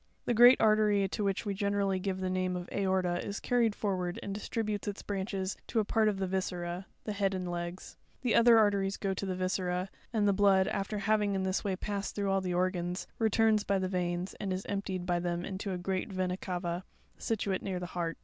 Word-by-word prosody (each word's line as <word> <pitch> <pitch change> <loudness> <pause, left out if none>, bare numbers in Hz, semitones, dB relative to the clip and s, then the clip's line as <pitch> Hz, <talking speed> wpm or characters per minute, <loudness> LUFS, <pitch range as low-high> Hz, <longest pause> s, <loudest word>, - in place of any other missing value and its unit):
'The 240 - +1
great 240 +3 +8
artery 210 -2 +4
to 210 +3 -3
which 195 +2 0
we 200 - -1
generally 200 -1 0
give 190 0 -2
the 185 - -1
name 185 0 0
of 175 0 -5
aorta, 185 -3 0
is 200 +1 -4
carried 235 -4 +2
forward 185 -3 -2
and 200 - -4
distributes 210 0 -3
its 205 - -4
branehes 195 -1 -2
to 230 - 0
a 215 - +1
part 220 +1 +2
of 210 -2 +1
the 190 - -1
viscera, 180 -1 -3 0.2
the 210 - -3
head 195 -1 0
and 180 -1 -3
legs. 175 +1 -5 0.2
'The 245 -3 +1
other 235 0 +7
arteries 200 -2 +2
go 195 -1 -1
to 195 +1 -4
the 185 - -1
viscera; 185 0 -1 0.2
and 215 -3 +2
the 200 - +4
blood, 195 -1 +4
after 195 +2 -2
having 210 -1 +1
in 190 - 0
this 190 0 0
way 195 -3 0
passed 200 +1 -4
through 200 -1 0
all 195 0 +2
the 185 -1 -2
organs, 180 0 -1
returns 220 -1 +3
by 200 - +1
the 185 -1 -1
veins, 180 0 -2
and 195 - -2
is 185 +1 -3
emptied 195 -3 -3
by 175 -1 +1
them 175 0 -2
into 195 +1 -4
a 185 - -2
great 185 +2 -2
vena 185 -1 -1
cava, 180 -1 -3 0.4
situate 200 -4 -1
near 185 -2 -3
the 180 - -4
heart. 170 -2 -3
195 Hz, 220 wpm, -31 LUFS, 185-205 Hz, 0.4 s, great